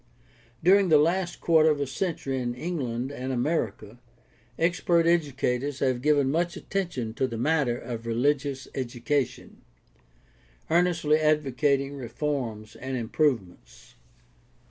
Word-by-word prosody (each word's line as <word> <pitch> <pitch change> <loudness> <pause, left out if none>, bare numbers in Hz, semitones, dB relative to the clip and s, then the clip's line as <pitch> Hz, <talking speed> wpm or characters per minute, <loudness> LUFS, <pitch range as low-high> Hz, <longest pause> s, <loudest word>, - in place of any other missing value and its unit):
During 190 +1 +5
the 155 - +7
last 175 +4 +1
quarter 160 -2 +5
of 150 -2 +1
a 140 - 0
century 135 -2 -3
in 120 -1 -3
England 130 -5 -3
and 130 -1 -4
America 120 -5 -2 0.6
expert 170 0 +2
educators 140 -5 0
have 130 -3 0
given 145 -1 +3
much 170 +3 0
attention 170 - -3
to 130 +3 0
the 115 -2 -5
matter 135 -2 +1
of 115 -1 -6
religious 135 +3 0
education, 130 +1 -3 1.1
earnestly 165 -3 +3
advocating 145 -2 +1
reforms 120 -4 -4
and 130 +3 -4
improvements. 105 - -2
140 Hz, 115 wpm, -26 LUFS, 120-155 Hz, 1.1 s, the